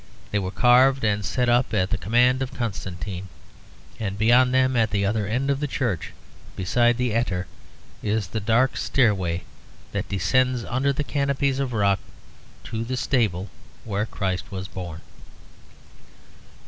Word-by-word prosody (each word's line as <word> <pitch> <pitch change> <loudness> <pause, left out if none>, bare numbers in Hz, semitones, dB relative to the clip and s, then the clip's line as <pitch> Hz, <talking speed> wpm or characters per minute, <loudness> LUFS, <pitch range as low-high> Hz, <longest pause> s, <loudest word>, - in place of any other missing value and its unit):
They 105 - +1
were 95 -2 -3
carved 125 +5 +4
and 105 -2 +1
set 125 +4 0
up 120 -1 +2
at 95 -2 +1
the 105 - +1
command 125 +5 +3
of 135 0 -2
Constantine; 95 -4 -4 0.7
and 100 -3 -3
beyond 120 +4 +5
them, 130 0 +3
at 115 -3 +3
the 100 -1 0
other 105 0 0
end 130 +6 0
of 140 - 0
the 150 - -1
church 120 - -2 0.4
beside 120 +5 +2
the 125 -3 0
attar, 95 -6 0 0.6
is 105 0 0
the 110 - -2
dark 115 +5 +2
stairway 95 -9 +1 0.5
that - - -3
descends 125 +6 +1
under 135 +3 +1
the 140 +2 -2
canopies 140 +1 0
of 135 -2 -1
rock 100 -3 +2 0.6
to 110 0 -4
the 125 +2 -3
stable 105 -8 0 0.3
where 105 0 -1
Christ 95 -2 -3
was 95 -1 -5
born. 85 -3 -7
115 Hz, 150 wpm, -24 LUFS, 100-130 Hz, 0.7 s, beyond